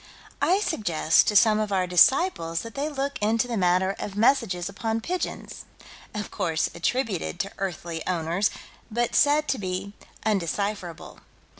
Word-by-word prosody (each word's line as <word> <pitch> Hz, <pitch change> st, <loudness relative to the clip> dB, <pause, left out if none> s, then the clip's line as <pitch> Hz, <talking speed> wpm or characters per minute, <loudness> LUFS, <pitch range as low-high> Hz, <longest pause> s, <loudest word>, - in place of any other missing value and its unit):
I 380 Hz, +4 st, +3 dB
suggest 175 Hz, -, +2 dB
to 210 Hz, -, +1 dB
some 215 Hz, 0 st, +5 dB
of 215 Hz, -1 st, -2 dB
our 190 Hz, -2 st, +2 dB
disciples 180 Hz, -, +3 dB
that 230 Hz, -1 st, -9 dB
they 285 Hz, +2 st, -2 dB
look 280 Hz, -1 st, -3 dB
into 225 Hz, +3 st, +1 dB
the 240 Hz, -, -3 dB
matter 185 Hz, 0 st, +2 dB
of 200 Hz, -, -5 dB
messages 210 Hz, -6 st, +2 dB
upon 220 Hz, +3 st, -2 dB
pigeons, 360 Hz, +9 st, -4 dB, 0.5 s
of 210 Hz, 0 st, -4 dB
course 170 Hz, -6 st, -1 dB
attributed 190 Hz, -1 st, -2 dB
to 195 Hz, -, -5 dB
earthly 170 Hz, -3 st, -4 dB
owners, 175 Hz, +3 st, 0 dB, 0.4 s
but 240 Hz, +1 st, -1 dB
said 300 Hz, +1 st, +4 dB
to 265 Hz, -, 0 dB
be 190 Hz, +1 st, -4 dB, 0.3 s
undecipherable. 200 Hz, -2 st, -2 dB
205 Hz, 145 wpm, -25 LUFS, 180-235 Hz, 0.5 s, some